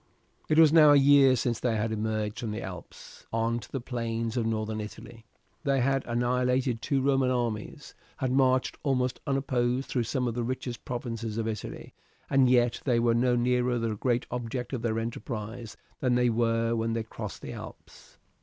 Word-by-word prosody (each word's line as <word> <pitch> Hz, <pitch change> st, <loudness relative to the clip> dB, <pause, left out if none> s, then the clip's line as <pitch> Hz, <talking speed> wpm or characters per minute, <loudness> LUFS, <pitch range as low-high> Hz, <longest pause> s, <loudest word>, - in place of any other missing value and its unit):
It 155 Hz, -, +3 dB
was 160 Hz, -2 st, +7 dB
now 155 Hz, -3 st, +8 dB
a -, -, +7 dB
year 140 Hz, -1 st, +6 dB
since 120 Hz, -2 st, -1 dB
they 120 Hz, -2 st, 0 dB
had 110 Hz, +1 st, -1 dB
emerged 110 Hz, -1 st, -2 dB
from 115 Hz, -, -3 dB
the 105 Hz, +2 st, -4 dB
Alps 90 Hz, -2 st, -10 dB
on 115 Hz, +1 st, 0 dB
to -, -, -13 dB
the 135 Hz, -, -2 dB
plains 115 Hz, -2 st, -3 dB
of 115 Hz, -3 st, 0 dB
Northern 110 Hz, -1 st, -2 dB
Italy. 115 Hz, +2 st, -10 dB, 0.4 s
They 140 Hz, -2 st, +2 dB
had 135 Hz, +1 st, +1 dB
annihilated 125 Hz, 0 st, 0 dB
two 135 Hz, 0 st, 0 dB
Roman 135 Hz, -2 st, +2 dB
armies, 120 Hz, +2 st, -3 dB, 0.2 s
had 130 Hz, -2 st, -1 dB
marched 130 Hz, -1 st, +2 dB
almost 130 Hz, -3 st, 0 dB
unopposed 130 Hz, -2 st, 0 dB
through 120 Hz, -3 st, 0 dB
some 125 Hz, +1 st, -1 dB
of 120 Hz, -, -1 dB
the 120 Hz, -, -2 dB
richest 125 Hz, 0 st, -4 dB
provinces 115 Hz, -3 st, -4 dB
of 115 Hz, -1 st, -1 dB
Italy, 110 Hz, -2 st, -6 dB, 0.4 s
and 135 Hz, -2 st, +5 dB
yet 120 Hz, -1 st, +3 dB
they 120 Hz, -4 st, +2 dB
were 115 Hz, 0 st, +3 dB
no 125 Hz, +1 st, +2 dB
nearer 125 Hz, 0 st, +1 dB
the 115 Hz, -2 st, -1 dB
great 120 Hz, +3 st, 0 dB
object 125 Hz, +1 st, -4 dB
of 125 Hz, -, -2 dB
their 115 Hz, -1 st, -1 dB
enterprise 115 Hz, 0 st, -5 dB, 0.2 s
than 125 Hz, -1 st, +1 dB
they 125 Hz, -1 st, +3 dB
were 115 Hz, 0 st, +1 dB
when 115 Hz, 0 st, -1 dB
they 115 Hz, -1 st, -1 dB
crossed 110 Hz, -, -8 dB
the -, -, -6 dB
Alps. -, -, -12 dB
120 Hz, 185 wpm, -28 LUFS, 115-130 Hz, 0.4 s, now